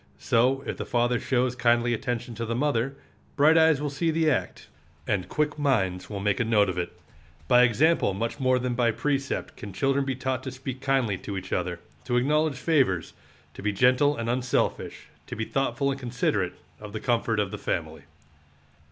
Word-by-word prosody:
So, 130 +4 +2
if - - -4
the - - -3
father 120 0 +1
shows 125 -1 0
kindly 120 -1 +2
attention 120 +1 -3
to 115 +1 -4
the 115 - -1
mother, 135 -1 0 0.4
bright 150 +3 +5
eyes 160 -3 +5
will 145 -1 -2
see 165 +4 -1
the 160 -1 +2
act, 130 - -3 0.4
and 95 -3 -1
quick 150 0 -1
minds 95 -11 0
will 100 -2 -4
make 100 0 0
a - - +3
note 105 -3 +3
of 90 - -4
it. 90 - -5 0.5
By 125 0 +6
example 125 - +3
much 115 +7 -3
more 130 -1 +3
than 125 0 -1
by 120 -1 +2
precept 140 +3 -2
can 100 -2 -9
children 135 +7 +1
be 135 -1 -2
taught 130 -1 -2
to 130 - -4
speak 130 0 -7
kindly 130 -8 +1
to 100 -2 -5
each 95 0 -6
other, 90 -1 -2 0.3
to 120 - +1
acknowledge 150 +3 +2
favors, 130 - +1 0.4
to - - -10
be 105 +1 0
gentle 130 +7 +3
and 115 0 -3
unselfish, 125 +1 -1 0.2
to - - -6
be 110 - -3
thoughtful 135 +2 0
and 135 - -4
considerate 115 -7 -1 0.3
of 105 -1 -10
the 110 - -3
comfort 115 -3 0
of 100 -2 -1
the - - -6
family. - - -3
125 Hz, 195 wpm, -26 LUFS, 110-135 Hz, 0.5 s, By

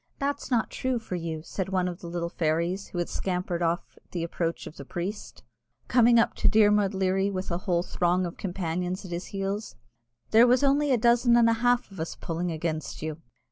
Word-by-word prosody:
"That's 285 +1 -2
not 235 -4 +1
true 260 -1 -1
for 225 -5 -7
you," 165 -3 -3
said 190 +2 -4
one 185 -1 +1
of 175 0 -5
the 170 - -8
little 170 0 -2
fairies 170 +4 0
who - - -8
had 175 - 0
scampered 180 -2 -2
off 170 0 -2
at - - -38
the 175 -2 -2
approach 170 0 -2
of 155 - -10
the - - -7
priest, 180 +8 -6 0.4
coming 240 -1 +5
up 230 - +3
to - - +3
Dermod 210 -2 +4
Leary 190 +1 +1
with 190 -2 -4
a 170 - -1
whole 175 -1 +2
throng 180 +1 +1
of 170 - -5
companions 180 0 -3
at 180 - -9
his 175 +1 -4
heels; 200 +2 -4 0.6
"there 230 +3 +7
was 250 +3 +4
only 285 +1 +3
a 255 - +4
dozen 235 +1 +4
and 235 -1 +5
a 230 - +4
half 245 -3 +2
of 195 - -11
us 160 - -4
pulling 170 +1 -3
against 155 -1 -3
you." 155 0 -5
185 Hz, 215 wpm, -27 LUFS, 170-225 Hz, 0.6 s, there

